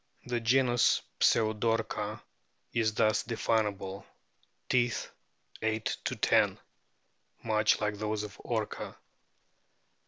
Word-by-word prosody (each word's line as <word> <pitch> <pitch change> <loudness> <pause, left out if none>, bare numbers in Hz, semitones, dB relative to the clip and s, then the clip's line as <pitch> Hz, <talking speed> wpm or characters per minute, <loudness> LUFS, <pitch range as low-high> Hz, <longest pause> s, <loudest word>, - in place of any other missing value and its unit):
The 120 -1 -1
genus 120 +1 +3 0.2
PSEUDORCA 110 0 +1 0.5
is 110 -2 +1
thus 110 0 +3
definable: 105 -4 -1 0.6
Teeth, 120 -2 +1 0.5
8 110 0 0
10, - - +2 0.9
much 110 -1 +3
like 105 -1 -2
those 105 0 -1
of 105 -1 -8
Orca. 110 -3 -3
110 Hz, 85 wpm, -30 LUFS, 105-115 Hz, 0.9 s, genus